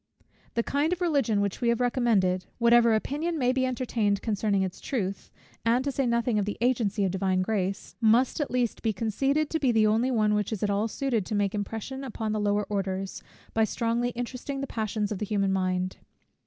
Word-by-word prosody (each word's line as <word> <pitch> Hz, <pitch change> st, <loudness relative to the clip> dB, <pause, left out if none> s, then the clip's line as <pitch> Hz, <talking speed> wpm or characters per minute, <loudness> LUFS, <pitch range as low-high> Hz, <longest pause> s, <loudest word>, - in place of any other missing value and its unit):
The 235 Hz, -, +2 dB
kind 290 Hz, +6 st, 0 dB
of 360 Hz, -, -4 dB
Religion 275 Hz, -, +2 dB
which 200 Hz, +3 st, -2 dB
we 235 Hz, -, +2 dB
have 235 Hz, -, +2 dB
recommended, 220 Hz, -8 st, +2 dB
whatever 235 Hz, -1 st, +5 dB
opinion 305 Hz, +9 st, -2 dB
may 250 Hz, -3 st, +2 dB
be 260 Hz, 0 st, +1 dB
entertained 230 Hz, -5 st, 0 dB
concerning 205 Hz, -3 st, +1 dB
its 185 Hz, -1 st, -5 dB
truth, 200 Hz, -7 st, -3 dB, 0.3 s
and 235 Hz, +3 st, +2 dB
to 280 Hz, -, 0 dB
say 270 Hz, -1 st, 0 dB
nothing 235 Hz, -2 st, +1 dB
of 200 Hz, -, 0 dB
the 210 Hz, -, -4 dB
agency 225 Hz, -4 st, +1 dB
of 190 Hz, -, 0 dB
Divine 190 Hz, -1 st, +1 dB
Grace, 195 Hz, -1 st, -2 dB
must 235 Hz, +6 st, +3 dB
at 290 Hz, -, -1 dB
least 245 Hz, -2 st, -1 dB
be 220 Hz, -2 st, 0 dB
conceded 270 Hz, +9 st, 0 dB
to 320 Hz, -, 0 dB
be 265 Hz, -4 st, +3 dB
the 220 Hz, -2 st, +4 dB
only 225 Hz, +4 st, +2 dB
one 215 Hz, -4 st, +2 dB
which 210 Hz, 0 st, 0 dB
is 215 Hz, -3 st, -3 dB
at 205 Hz, -, +1 dB
all 205 Hz, +2 st, +1 dB
suited 235 Hz, -2 st, -1 dB
to 215 Hz, -, -2 dB
make 200 Hz, -1 st, +1 dB
impression 225 Hz, +6 st, -4 dB
upon 220 Hz, -4 st, -3 dB
the 215 Hz, -, -1 dB
lower 205 Hz, 0 st, +1 dB
orders, 195 Hz, -2 st, -3 dB, 0.3 s
by 225 Hz, -, +3 dB
strongly 235 Hz, +2 st, 0 dB
interesting 255 Hz, +3 st, -4 dB
the 275 Hz, -, -2 dB
passions 215 Hz, -4 st, -2 dB
of 205 Hz, -, -3 dB
the 210 Hz, -, -2 dB
human 200 Hz, -2 st, +1 dB
mind. 185 Hz, -1 st, -1 dB
225 Hz, 210 wpm, -27 LUFS, 205-250 Hz, 0.3 s, whatever